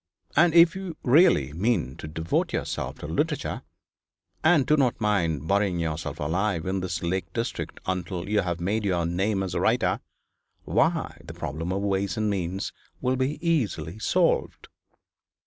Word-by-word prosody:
And 170 +2 +5
if 170 0 +7
you 190 -4 -6
really 125 - +5
mean 85 - 0
to - - -7
devote 80 +2 -1
yourself - - -3
to - - -7
literature, - - -1 0.8
and 160 -4 +5
do 150 - +4
not 135 -5 +1
mind 85 -9 0
burying 100 -2 +2
yourself 80 -2 -3
alive 85 +3 0
in 95 +1 -1
this 90 -1 -3
lake 85 -1 -2
district 115 0 -3
until 90 -1 -3
you 105 0 +2
have 85 -1 -2
made 105 +5 0
your 90 -4 +1
name 95 +4 0
as 95 - -4
a - - 0
writer, - - +2 0.6
why - - 0
the - - -9
problem 80 +5 -4
of 100 +1 -1
ways 100 +2 0
and 110 -1 +1
means 95 0 -3 0.3
will 130 +1 +1
be 130 +3 -1
easily 105 - 0
solved.' - - +1
95 Hz, 160 wpm, -26 LUFS, 85-115 Hz, 0.8 s, if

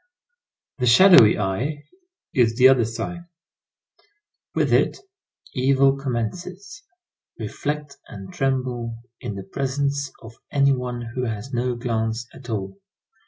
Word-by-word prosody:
The 125 - +1
shadowy 130 - +8
eye 120 +10 -2 0.5
is 115 -4 +3
the 130 +2 +7
other 130 -4 +4
sign. 170 +10 -5 1.3
With - - +1
it, - - +3 0.6
evil 135 +1 +3
commences. 175 - -5 0.6
Reflect 150 -1 -4
and 95 -1 -10
tremble 125 -3 -2 0.2
in 110 -5 -5
the 95 - -6
presence 140 +5 -2
of 115 0 -12
any 140 -1 +4
one 125 -2 -4
who 125 -1 -2
has 110 +3 -5
no 125 0 0
glance 115 -1 -2
at 130 -2 -12
all. 110 - -4
125 Hz, 120 wpm, -23 LUFS, 115-140 Hz, 1.3 s, shadowy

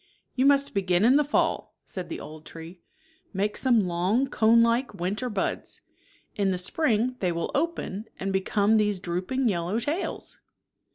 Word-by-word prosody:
" - - -48
You 260 +1 +3
must 280 0 +3
be 200 - +1
gin 180 +1 +2
in 255 +4 +6
the 295 - +4
fall," 290 - -1
said 185 -2 -7
the - - -5
old 155 0 -10
tree, 165 +3 -11 0.3
" - - -36
make 205 +2 0
some 240 -6 +3
long 180 +9 +1
conelike 230 +1 +3
winter 200 +7 -2
buds. 205 -4 -3 0.5
In 200 -2 +1
the 185 - 0
spring 245 - 0
they 180 -2 0
will 170 0 -3
open 280 - -2
and 195 0 -2
become 200 +3 +2
these 210 -2 +1
drooping 185 +10 -2
yel 170 -6 0
low 200 +5 -1
tails." 300 +10 -4
210 Hz, 175 wpm, -26 LUFS, 185-250 Hz, 0.5 s, in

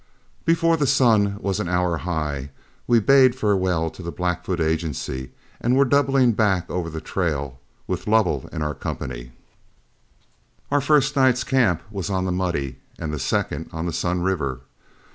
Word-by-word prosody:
Before 165 0 +3
the 145 -3 +1
sun 110 -7 +3
was 100 0 -1
an 105 - -2
hour 90 -1 +1
high, 75 -5 -3 0.4
we 120 -1 +5
bade 130 +2 +5
farewell 95 -8 +1
to - - -12
the 85 -1 -5
Blackfoot 90 0 -2
Agency 80 -5 -2 0.3
and 120 +2 +1
were 140 +1 +5
doubling 135 -2 +3
back 105 -5 +1
over 90 -2 -2
the 80 0 -5
trail, 70 -8 -3 0.3
with - - -4
Lovell 105 - +2
in 75 - -3
our 75 0 -2
company. - - -6 1.4
Our 145 0 +3
first 145 0 +3
night's 130 -2 +3
camp 120 -11 +2
was 100 -2 -4
on 95 -1 0
the 95 - -1
Muddy 85 -8 -2 0.2
and 75 -1 -4
the 75 - -3
second - - -2
on 80 +1 -4
the 85 - -2
Sun 90 +1 -1
River. 70 -9 -1
90 Hz, 160 wpm, -23 LUFS, 80-120 Hz, 1.4 s, we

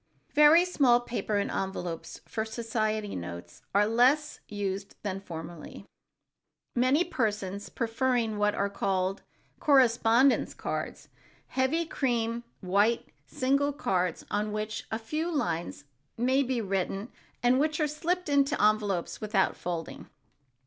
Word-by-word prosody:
Very 300 +4 +7
small 265 -9 +4
paper 235 -3 -2
and 200 - -1
envelopes 180 -3 -4
for 220 - -3
society 220 -2 -2
notes 85 0 -7
are 205 +1 +5
less 255 +7 +3
used 200 -1 -4
than 195 -2 -2
formerly, 170 -3 -9 0.9
many 255 +7 +3
persons 210 - -2
preferring 230 -2 0
what 210 0 +2
are 200 - +1
called 195 -1 -1 0.4
correspondence 255 -2 +4
cards, - - -4 0.4
heavy 275 +6 +1
cream 235 -6 -1 0.2
white 205 +5 +2 0.2
single 275 +2 +1
cards 185 - -1
on 210 +1 0
which 215 0 -4
a 220 - -1
few 305 +9 -3
lines 170 - -2 0.3
may 260 +4 +3
be 255 -3 0
written 195 +2 -2 0.3
and 250 +2 +4
which 305 +2 +1
are 305 - +3
slipped 345 +5 -2
into 280 -1 +3
their 210 - +6
envelopes 205 -5 -2
without 210 -2 +1
folding. 170 -2 -5
225 Hz, 125 wpm, -29 LUFS, 200-265 Hz, 0.9 s, Very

